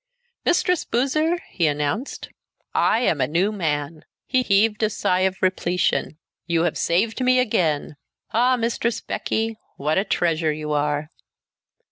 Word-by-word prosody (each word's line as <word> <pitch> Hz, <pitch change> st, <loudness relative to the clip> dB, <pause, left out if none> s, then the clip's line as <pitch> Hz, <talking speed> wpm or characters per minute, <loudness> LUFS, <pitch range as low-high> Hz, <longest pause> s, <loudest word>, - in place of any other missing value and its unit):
"Mistress 360 Hz, 0 st, +2 dB
Boozer," 310 Hz, +8 st, +1 dB
he 170 Hz, -4 st, +1 dB
announced, 150 Hz, -, -2 dB, 0.4 s
"I 225 Hz, -, +3 dB
am 160 Hz, -, +1 dB
a -, -, +2 dB
new 175 Hz, +7 st, +1 dB
man." 155 Hz, -5 st, -2 dB, 0.2 s
He 255 Hz, -1 st, +2 dB
heaved 210 Hz, -1 st, +2 dB
a 215 Hz, -, +3 dB
sigh 185 Hz, -3 st, 0 dB
of 190 Hz, 0 st, 0 dB
repletion. 180 Hz, -3 st, 0 dB, 0.3 s
"You 170 Hz, -1 st, +1 dB
have 175 Hz, -, 0 dB
saved 215 Hz, +9 st, 0 dB
me 255 Hz, 0 st, +4 dB
again. 165 Hz, -, 0 dB, 0.3 s
Ah! 250 Hz, +3 st, +3 dB
Mistress 230 Hz, -1 st, -1 dB
Becky, 225 Hz, 0 st, -2 dB, 0.2 s
what 155 Hz, +5 st, +1 dB
a -, -, +1 dB
treasure 165 Hz, -5 st, +1 dB
you 150 Hz, 0 st, -4 dB
are!" 150 Hz, +1 st, -1 dB
185 Hz, 140 wpm, -23 LUFS, 155-230 Hz, 0.4 s, me